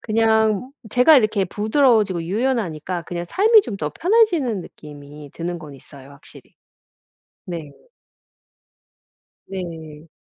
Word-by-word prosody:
그냥 220 Hz, +1 st, +1 dB, 0.2 s
제가 250 Hz, +7 st, +6 dB
이렇게 215 Hz, -5 st, +2 dB
부드러워지고 215 Hz, -, +1 dB
유연하니까 185 Hz, -, -2 dB
그냥 175 Hz, +1 st, -5 dB
삶이 430 Hz, -, +5 dB
좀 210 Hz, -, -6 dB
더 150 Hz, -5 st, -4 dB
편해지는 340 Hz, -, +1 dB
느낌이 145 Hz, -2 st, -12 dB
드는 175 Hz, +1 st, -5 dB
건 150 Hz, -3 st, -11 dB
있어요, 135 Hz, 0 st, -15 dB
확실히. 140 Hz, -1 st, -16 dB, 0.9 s
네. 165 Hz, -5 st, -7 dB, 1.8 s
네. 165 Hz, -4 st, -8 dB
190 Hz, 245 characters per minute, -21 LUFS, 160-235 Hz, 1.8 s, 제가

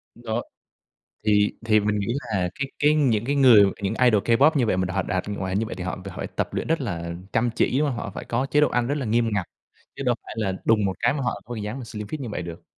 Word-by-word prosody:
Đó, 120 Hz, 0 st, -3 dB, 0.9 s
thì 105 Hz, -1 st, +4 dB
thì 110 Hz, -1 st, +5 dB
mình 105 Hz, 0 st, 0 dB
nghĩ 100 Hz, -, -2 dB, 0.3 s
là 90 Hz, -3 st, +1 dB
cái 140 Hz, 0 st, -4 dB
cái 150 Hz, +1 st, +4 dB
những 120 Hz, -8 st, +2 dB
cái 140 Hz, +3 st, 0 dB
người, 125 Hz, -7 st, +8 dB, 0.2 s
những 100 Hz, +3 st, -1 dB
idol 110 Hz, -5 st, +4 dB
K-pop 125 Hz, +6 st, +5 dB
như 125 Hz, -5 st, +2 dB
vậy 95 Hz, -, +1 dB
mà 90 Hz, 0 st, -1 dB
họ 95 Hz, -, +1 dB
đạt 95 Hz, +2 st, -2 dB
ngoài 95 Hz, -2 st, -3 dB
hình 100 Hz, -, +1 dB
như 110 Hz, -, -1 dB
vậy -, -, -5 dB
thì 90 Hz, 0 st, -6 dB
họ 90 Hz, -, -3 dB
họ 95 Hz, -, -8 dB
phải -, -, -3 dB
tập -, -, -3 dB
luyện -, -, -2 dB
rất 165 Hz, -2 st, +1 dB
là 85 Hz, -8 st, -3 dB, 0.2 s
chăm 120 Hz, +1 st, +2 dB
chỉ, 130 Hz, -, +1 dB
đúng 150 Hz, -1 st, +2 dB
hông? 125 Hz, -, -2 dB
Họ -, -, -4 dB
phải -, -, -6 dB
có 125 Hz, +3 st, -1 dB
chế 145 Hz, +1 st, +2 dB
độ 150 Hz, -, +4 dB
ăn 120 Hz, -1 st, 0 dB
rất 140 Hz, -, 0 dB
là 130 Hz, -, -3 dB
nghiêm 115 Hz, +1 st, +2 dB
ngặt, 95 Hz, -3 st, -1 dB, 0.5 s
chứ -, -, -4 dB
đâu 125 Hz, -2 st, +2 dB
phải -, -, -9 dB
là 100 Hz, -4 st, 0 dB
đùng 110 Hz, -2 st, +3 dB
một 95 Hz, -1 st, 0 dB
cái 120 Hz, -, +3 dB
mà 145 Hz, -, -3 dB
họ 125 Hz, -, -2 dB
có 120 Hz, -1 st, -6 dB
dáng 110 Hz, +5 st, -5 dB
slim 105 Hz, -2 st, -7 dB
fit 150 Hz, +6 st, -5 dB
như 125 Hz, -, -4 dB
vậy 90 Hz, -, -3 dB
được. 85 Hz, -1 st, -8 dB
110 Hz, 285 wpm, -24 LUFS, 100-125 Hz, 0.9 s, người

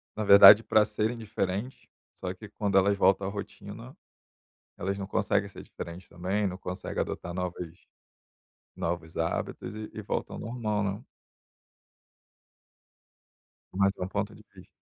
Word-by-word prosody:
na 110 Hz, -, -2 dB
verdade 100 Hz, +2 st, +10 dB
para 110 Hz, -1 st, +4 dB
serem 110 Hz, +3 st, -1 dB
diferentes, 105 Hz, +2 st, -4 dB, 0.3 s
só 90 Hz, -, -5 dB
que 100 Hz, +3 st, -12 dB
quando 100 Hz, -2 st, +1 dB
elas 100 Hz, +1 st, +4 dB
voltam 95 Hz, 0 st, +3 dB
à -, -, -1 dB
rotina, 100 Hz, 0 st, -8 dB, 0.8 s
elas 100 Hz, +2 st, -2 dB
não 100 Hz, -, -4 dB
conseguem 100 Hz, 0 st, 0 dB
ser 100 Hz, -, -11 dB
diferentes 85 Hz, +2 st, -9 dB
também, 95 Hz, +4 st, -1 dB
não 90 Hz, -1 st, -4 dB
conseguem 90 Hz, 0 st, -5 dB
adotar 85 Hz, -, -4 dB
novas 90 Hz, -1 st, -3 dB, 1.1 s
novos 85 Hz, -1 st, -4 dB
hábitos 85 Hz, +2 st, -2 dB
e 110 Hz, 0 st, -6 dB
e -, -, -6 dB
voltam -, -, -3 dB
ao -, -, -7 dB
normal, 110 Hz, -3 st, -2 dB
né. 100 Hz, +5 st, -3 dB, 2.7 s
Mais 100 Hz, 0 st, +3 dB
um 90 Hz, -, -3 dB
ponto -, -, -3 dB
de -, -, -15 dB
vista. -, -, -14 dB
100 Hz, 140 wpm, -28 LUFS, 90-105 Hz, 2.7 s, verdade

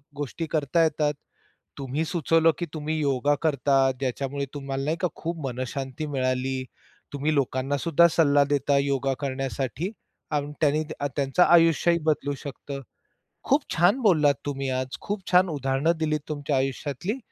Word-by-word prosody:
गोष्टी 145 Hz, +3 st, -4 dB
करता 160 Hz, +2 st, +2 dB
येतात. 150 Hz, -1 st, +1 dB, 0.6 s
तुम्ही 140 Hz, +3 st, -2 dB
सुचवलं 165 Hz, 0 st, +3 dB
की 175 Hz, -, -1 dB
तुम्ही 155 Hz, 0 st, -2 dB
योगा 145 Hz, 0 st, +2 dB
करतात, 135 Hz, -3 st, +3 dB
ज्याच्यामुळे 140 Hz, +1 st, -2 dB
तुम्हाला 135 Hz, -1 st, -4 dB
नाही 160 Hz, +2 st, 0 dB
का, 180 Hz, -, +2 dB
खूप 165 Hz, -3 st, -4 dB
मनःशांती 130 Hz, +3 st, -4 dB
मिळाली. 130 Hz, 0 st, -1 dB, 0.5 s
तुम्ही 145 Hz, +2 st, 0 dB
लोकांनासुद्धा 140 Hz, +5 st, +2 dB
सल्ला 145 Hz, -3 st, +4 dB
देता 140 Hz, 0 st, +2 dB
योगा 140 Hz, -1 st, +1 dB
करण्यासाठी 135 Hz, -, -3 dB, 0.4 s
आणि 145 Hz, -1 st, -1 dB
त्यांनी 155 Hz, +1 st, +3 dB, 0.2 s
अ, 145 Hz, -, 0 dB
त्यांचं 140 Hz, +4 st, +3 dB
आयुष्यही 170 Hz, 0 st, +4 dB
बदलू 145 Hz, -2 st, +1 dB
शकतं. 140 Hz, 0 st, -6 dB, 0.6 s
खूप 280 Hz, +2 st, +3 dB
छान 175 Hz, +10 st, +3 dB
बोललात 155 Hz, -9 st, +4 dB
तुम्ही 135 Hz, -1 st, -2 dB
आज. 130 Hz, 0 st, -2 dB
खूप 205 Hz, 0 st, -3 dB
छान 180 Hz, +1 st, +6 dB
उदाहरणं 140 Hz, +2 st, +1 dB
दिलीत 155 Hz, -2 st, 0 dB
तुमच्या 145 Hz, -2 st, -2 dB
आयुष्यातली. 140 Hz, -, -2 dB
145 Hz, 140 wpm, -25 LUFS, 135-160 Hz, 0.6 s, छान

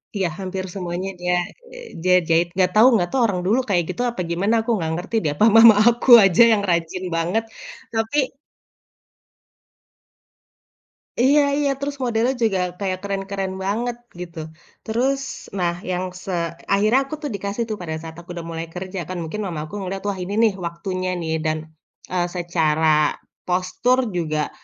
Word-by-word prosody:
Iya. 190 Hz, -3 st, +1 dB
Hampir 190 Hz, 0 st, -4 dB
semuanya 180 Hz, 0 st, -3 dB
dia, 180 Hz, 0 st, 0 dB, 0.4 s
eee, -, -, -10 dB, 0.2 s
dia 180 Hz, 0 st, +5 dB
jahit. 165 Hz, +1 st, +3 dB
Enggak 185 Hz, -1 st, +2 dB
tahu 220 Hz, +4 st, +7 dB
enggak 175 Hz, -6 st, +2 dB
tahu 265 Hz, -, +1 dB
orang 185 Hz, -4 st, -2 dB
dulu 225 Hz, +6 st, +3 dB
kayak 175 Hz, -3 st, +2 dB
gitu, 210 Hz, -, -3 dB
apa 235 Hz, -5 st, -4 dB
gimana, 195 Hz, +6 st, +1 dB
aku 225 Hz, -, -7 dB
enggak 160 Hz, -4 st, -2 dB
ngerti 175 Hz, +7 st, -5 dB
deh. 150 Hz, -, +1 dB
Apa 210 Hz, -, +4 dB
mama 225 Hz, -1 st, +9 dB
aku 240 Hz, +2 st, -2 dB, 0.2 s
aja 190 Hz, +2 st, +4 dB
yang 210 Hz, -, +1 dB
rajin 170 Hz, +1 st, -1 dB
banget. 175 Hz, +7 st, 0 dB, 0.5 s
tapi 230 Hz, +5 st, 0 dB, 2.9 s
Iya 280 Hz, +4 st, +5 dB, 0.2 s
iya. 290 Hz, -1 st, +1 dB
Terus, 280 Hz, 0 st, -3 dB
modelnya 240 Hz, +1 st, +1 dB
juga 200 Hz, -4 st, +2 dB, 0.2 s
kayak 185 Hz, -2 st, -2 dB
keren-keren 195 Hz, -1 st, -3 dB
banget, 235 Hz, +4 st, -1 dB, 0.2 s
gitu. 170 Hz, -2 st, -8 dB, 0.5 s
Terus, 260 Hz, +5 st, 0 dB, 0.4 s
nah, 175 Hz, -2 st, +1 dB, 0.2 s
yang 180 Hz, 0 st, -1 dB, 0.2 s
se 190 Hz, -, -4 dB, 0.4 s
akhirnya 215 Hz, +6 st, +4 dB
aku 275 Hz, -, -5 dB
tuh 295 Hz, -, -3 dB
dikasih 200 Hz, +3 st, -3 dB
tuh 215 Hz, -, -3 dB
pada 160 Hz, -2 st, -4 dB
saat 160 Hz, 0 st, -9 dB
aku 170 Hz, +2 st, -13 dB
udah 170 Hz, -1 st, -6 dB
mulai 165 Hz, 0 st, -4 dB
kerja. 185 Hz, +1 st, -5 dB
Kan, 185 Hz, -, -4 dB
mungkin 190 Hz, +7 st, -5 dB
mama 170 Hz, -5 st, -4 dB
aku 155 Hz, -, -15 dB
ngeliat. 195 Hz, +1 st, -4 dB
Wah, 200 Hz, -, -3 dB
ini 190 Hz, +3 st, -5 dB
nih, 220 Hz, -3 st, +4 dB
waktunya 185 Hz, +2 st, -3 dB
nih. 160 Hz, -1 st, -2 dB
Dan, 155 Hz, 0 st, +1 dB, 0.6 s
eee, 175 Hz, -1 st, +1 dB
secara 160 Hz, -3 st, +2 dB, 0.3 s
postur 185 Hz, +8 st, +1 dB, 0.2 s
juga 155 Hz, -3 st, -1 dB
190 Hz, 165 wpm, -22 LUFS, 175-225 Hz, 2.9 s, mama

